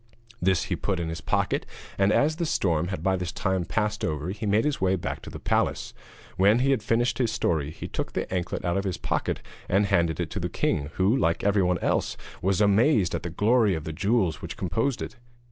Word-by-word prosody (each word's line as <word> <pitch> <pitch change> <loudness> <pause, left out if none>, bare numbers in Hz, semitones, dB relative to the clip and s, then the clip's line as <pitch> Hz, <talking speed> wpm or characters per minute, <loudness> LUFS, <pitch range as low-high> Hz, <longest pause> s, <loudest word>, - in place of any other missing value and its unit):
This 95 -1 +2
he - - -2
put 95 -3 -2
into 85 -1 -2
his 80 - -6
pocket, - - 0 0.3
and 95 +1 +3
as 155 +7 +2
the 170 - -1
storm 85 - +1
had 90 -3 -4
by 95 0 +2
this 90 -2 -3
time 95 -2 -1
passed 105 +1 -1
over 75 +1 -2
he 105 +3 -4
made 105 +5 +3
his 150 -7 -1
way 95 0 +3
back 85 - -4
to - - -9
the - - -7
palace. - - 0 0.4
When 100 +4 +5
he 135 +3 +2
had 135 - +2
finished 115 +3 +1
his 120 -3 +2
story, 80 -9 0
he 80 - -7
took - - -4
the - - -1
anklet 90 -1 -2
out 85 +1 +1
of 100 - 0
his 95 -3 -2
pocket - - -2 0.3
and 100 +3 +3
handed 85 -5 +1
it - - -2
to - - -3
the - - -2
king, 70 -1 -1
who, 95 +6 +3
like 85 -11 +1
everyone 95 -3 +3
else, - - 0 0.2
was 95 +2 +1
amazed 105 - +4
at - - -1
the 85 - -4
glory 105 +3 +3
of 80 - -4
the 80 - -5
jewels 95 -1 +1
which - - -6
composed 115 - -1
it. 120 - -8
95 Hz, 230 wpm, -26 LUFS, 85-110 Hz, 0.4 s, When